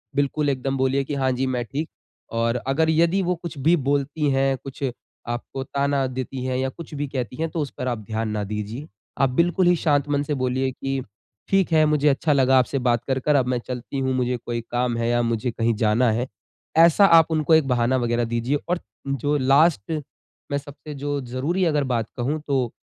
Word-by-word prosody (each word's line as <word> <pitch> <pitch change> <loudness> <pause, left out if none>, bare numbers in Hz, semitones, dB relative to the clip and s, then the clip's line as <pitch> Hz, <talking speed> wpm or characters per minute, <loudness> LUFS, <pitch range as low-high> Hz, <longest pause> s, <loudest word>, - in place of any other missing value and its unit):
बिल्कुल 145 +1 +1
एकदम 135 0 -1
बोलिए 135 +1 +1
कि 145 +2 -4
हाँ 130 -1 +1
जी 130 +1 -1
मैं 125 -2 -1
ठीक। 150 +6 -4 0.5
और 115 +1 +1
अगर 160 +4 +2
यदि 170 +4 +3
वो 180 0 +1
कुछ 170 -2 -8
भी 155 +6 +4
बोलती 145 +1 0
हैं, 135 0 +2
कुछ 135 +1 -8 0.4
आपको 120 +3 -4
ताना 140 0 0
देती 130 0 -5
हैं 130 -1 -1
या 130 +1 0
कुछ 165 +4 -11
भी 145 0 -2
कहती 125 -4 -4
हैं 160 0 -1
तो 165 - -4
उस 145 - -3
पर 130 - -3
आप 120 - -1
ध्यान 110 +1 -3
ना 105 -1 -2
दीजिए। 105 +7 -5 0.3
आप 135 - +4
बिल्कुल 175 +7 +2
ही 175 - +5
शांत 145 -3 +1
मन 145 0 +1
से 150 - -2
बोलिए 130 0 0
कि 135 +1 -3 0.5
ठीक 195 -3 +2
है, 155 -1 +5
मुझे 150 -1 +2
अच्छा 145 +2 +2
लगा 135 -1 +4
आपसे 130 +2 0
बात 120 -2 +1
कर 130 -1 0
कर 150 +3 +1
अब 130 -3 +3
मैं - - +1
चलती 125 +2 -4
हूँ, 130 0 0
मुझे 125 -1 0
कोई 120 0 -4
काम 120 -1 0
है 115 0 0
या 120 0 +2
मुझे 115 +1 -1
कहीं 115 0 0
जाना 110 +2 +2
है। 120 +4 -1 0.5
ऐसा 170 +4 +7
आप 165 -3 +6
उनको 155 0 +2
एक 155 -4 +3
बहाना 125 0 +2
वगैरह 120 -1 0
दीजिए 120 +5 0
और 180 0 +1 0.3
जो 140 +2 0
लास्ट 140 - +3 0.6
में 140 - +1
सबसे 145 +1 -9
जो 145 +1 -2
ज़रूरी 135 +9 -1
अगर 150 -3 +2
बात 115 -2 0
कहूँ 135 +6 -1
तो 130 -5 0
135 Hz, 215 wpm, -23 LUFS, 125-150 Hz, 0.6 s, ऐसा